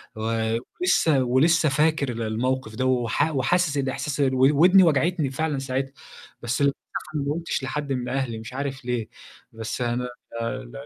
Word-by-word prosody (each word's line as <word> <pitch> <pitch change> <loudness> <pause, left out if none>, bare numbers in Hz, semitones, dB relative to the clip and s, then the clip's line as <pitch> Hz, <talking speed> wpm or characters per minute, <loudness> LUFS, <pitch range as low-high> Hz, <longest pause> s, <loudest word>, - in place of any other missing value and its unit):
و 110 0 -1 0.2
ولسه 160 - +3
ولسه 155 +6 +3
فاكر 150 -1 +2
ال 115 -1 -5
الموقِف 115 +1 -2
ده، 130 +3 -1
وح 130 +4 +1
وحاسس 150 +3 +1
الإحساس 140 +2 -2
ال 135 -2 +2
و 130 +1 +5
ودني 185 +2 +7
وجعتني 160 -1 +2
فعلًا 150 0 -1
ساعتها، 135 +1 -3 0.5
بس 120 +3 -2
بصراحة 140 -1 +4 0.4
أنا 145 - 0
ما 140 +1 -1
قُلتش 165 -4 -3
لحد 140 +1 -2
من 125 -1 -3
أهلي 130 -4 -2
مش 115 +3 -9
عارف 135 -1 -4
ليه، 120 -3 -2 0.4
بس 110 +2 -5
أنا 120 +1 0 0.4
ل 120 +1 -4
130 Hz, 165 wpm, -24 LUFS, 120-150 Hz, 0.5 s, ودني